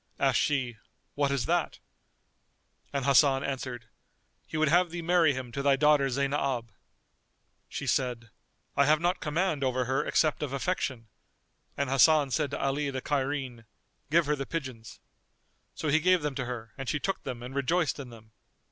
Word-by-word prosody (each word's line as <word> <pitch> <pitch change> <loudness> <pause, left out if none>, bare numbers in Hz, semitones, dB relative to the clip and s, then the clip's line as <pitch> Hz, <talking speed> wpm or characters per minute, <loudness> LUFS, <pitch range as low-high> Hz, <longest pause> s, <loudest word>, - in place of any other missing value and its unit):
Asked 135 -3 +2
she 130 -6 0 0.4
"What 145 -1 +1
is 140 -4 -1
that?" - - 0 1.1
And 140 -2 -2
Hasan 140 -1 +4
answered, 125 -3 -4 0.6
"He - - -5
would 155 0 +3
have 175 +4 +4
thee 170 0 -5
marry 165 -4 +3
him 130 -2 -6
to 140 - -3
thy 140 0 +4
daughter 145 -1 +4
Zaynab." 135 -3 -1 1.0
She - - -5
said, 120 -4 -1 0.4
"I 140 - +4
have 155 0 +4
not 175 +3 0
command 155 -1 -1
over 130 -1 0
her 130 +3 0
except 155 -2 +1
of 145 -3 -3
affection"; 135 -6 -2 0.7
and 140 - 0
Hasan 140 +1 +4
said 150 +1 0
to 140 - -4
Ali 140 +1 0
the 130 -1 -4
Cairene 135 -4 -2 0.4
"Give 165 +2 +4
her 150 +1 +1
the 135 -1 -5
pigeons." 130 -9 -6 0.8
So 155 - -2
he 155 +2 +4
gave 180 0 +3
them 150 -2 -1
to 130 -2 -3
her, 115 -3 -6
and 135 - -4
she 150 - 0
took 195 +6 -2
them 125 -3 -6
and 125 +2 -7
rejoiced 150 +4 0
in 135 -3 -7
them. 110 -2 -15
140 Hz, 175 wpm, -29 LUFS, 130-150 Hz, 1.1 s, Hasan